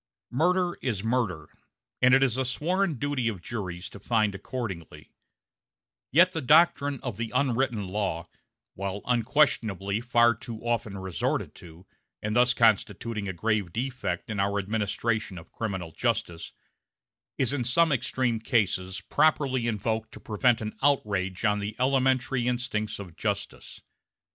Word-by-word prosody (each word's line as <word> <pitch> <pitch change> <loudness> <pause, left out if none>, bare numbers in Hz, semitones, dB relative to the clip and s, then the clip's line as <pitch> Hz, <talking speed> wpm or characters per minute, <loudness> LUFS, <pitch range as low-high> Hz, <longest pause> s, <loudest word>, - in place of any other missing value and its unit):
Murder 175 +5 +1
is 110 -7 -2
murder, 110 -9 -1 0.5
and 125 +1 +7
it 135 - +4
is 130 -4 +2
the 130 +2 0
sworn 170 +7 0
duty 135 -1 -1
of 105 -5 -2
juries 90 -2 -5
to 100 - -11
find 110 0 +1
accordingly; 95 - -6 1.0
yet 175 +6 +6
the 160 - -3
doctrine 145 -1 +4
of 120 -6 -4
the 115 -1 -3
"unwritten 125 -5 +1
law" 95 -4 -2 0.5
while 100 +1 -4
unquestionably 115 -5 +1
far 120 -1 +4
too 110 0 -8
often 115 -4 -1
resorted 95 -2 -2
to, 85 +2 -14 0.3
and 105 0 -3
thus 125 +1 +4
constituting 110 -1 +1
a 95 - -3
grave 105 0 0
defect 130 0 -3
in 105 - -3
our 100 +1 +1
administration 105 0 -1
of 80 -1 -12
criminal 95 -7 -4
justice 85 +1 -2 0.9
is 130 +1 +1
in 135 -4 0
some 155 +7 +3
extreme 125 -3 0
cases 100 -5 0
properly 130 -3 +2
invoked 110 0 -2
to - - -10
prevent 115 +2 +1
an 110 0 -4
outrage 100 -8 +1
on 105 -1 +2
the 105 +1 -4
elementary 130 -1 +2
instincts 120 -4 -1
of 90 -5 -9
justice. - - -4
115 Hz, 140 wpm, -27 LUFS, 100-130 Hz, 1.0 s, and